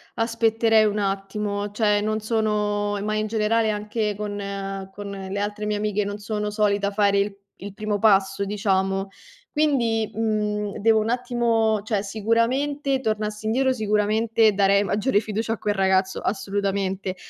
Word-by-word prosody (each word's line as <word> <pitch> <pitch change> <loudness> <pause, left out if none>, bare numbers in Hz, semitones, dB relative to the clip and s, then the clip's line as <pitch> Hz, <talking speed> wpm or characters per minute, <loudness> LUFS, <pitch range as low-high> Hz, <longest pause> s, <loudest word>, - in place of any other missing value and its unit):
aspetterei 225 -1 +3
un 210 0 0
attimo, 200 +1 -2
cioè 210 0 +1
non 215 +1 -1
sono 210 -2 0
ma 215 0 -1
in 215 0 0
generale 220 +1 +1
anche 210 0 -2
con 205 0 -4
ehm, 195 -1 -5
con 200 +1 -7
le 195 0 -5
altre 210 +1 -3
mie 210 0 0
amiche 210 0 0
non 205 0 -4
sono 210 0 -3
solita 205 -1 +1
fare 200 -1 +2
il 200 0 -1 0.2
il 200 0 -8
primo 215 -1 -2
passo, 195 -2 +3
diciamo. 195 -1 0 0.4
Quindi, 240 -8 +1
mhmm, 210 -2 -1
devo 220 +1 +4
un 220 +2 -1
attimo 230 -3 +1
cioè 215 -2 -1
sicuramente 250 +7 0
tornassi 215 -2 -2
indietro, 260 +4 +2
sicuramente 215 0 +2
darei 200 0 +4
maggiore 205 +3 +1
fiducia 220 +1 -2
a 225 - -6
quel 205 -1 -1
ragazzo, 190 0 +1
assolutamente. 195 -1 -2
210 Hz, 150 wpm, -24 LUFS, 200-220 Hz, 0.4 s, devo